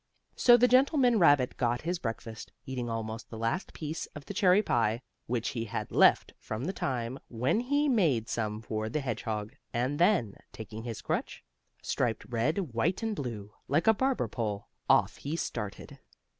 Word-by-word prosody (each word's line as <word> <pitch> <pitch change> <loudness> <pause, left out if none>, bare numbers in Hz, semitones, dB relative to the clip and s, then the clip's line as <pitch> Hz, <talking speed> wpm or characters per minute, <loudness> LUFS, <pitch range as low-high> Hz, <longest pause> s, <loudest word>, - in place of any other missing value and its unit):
So 240 -1 +7
the 245 - +5
old 250 - +1
gentleman 255 -3 +4
rabbit 145 -7 +4
got 120 -1 0
his 175 +2 -2
breakfast, 115 -3 -6
eating 125 -2 -4
almost 115 +1 -4
the 115 - -8
last 115 - -2
piece 155 +1 -5
of 150 -2 -9
the - - -6
cherry 195 -1 +4
pie, 115 - +1 0.2
which 120 -1 -1
he 115 -2 -3
had 100 - -4
left - - +4
from 110 +5 -5
the 185 - -2
time 130 -5 -3
when 125 - 0
he 285 +4 +1
made 160 - +2
some 110 -1 -3
for 110 0 -3
the 150 +6 -1
hedgehog, 110 -4 -3 0.2
and 130 +5 -1
then, 175 - +3
taking 110 0 -8
his 115 -3 -5
crutch, - - -3 0.4
striped 115 -2 -1
red, 135 - -1
white 170 - 0
and 220 -1 -1
blue, 110 - -5
like 155 +5 +2
a 225 - +6
barber 265 +4 0
pole, 105 -4 -4 0.2
off - - +4
he 145 +3 -4
started. 105 -10 -5
125 Hz, 175 wpm, -30 LUFS, 115-180 Hz, 0.4 s, So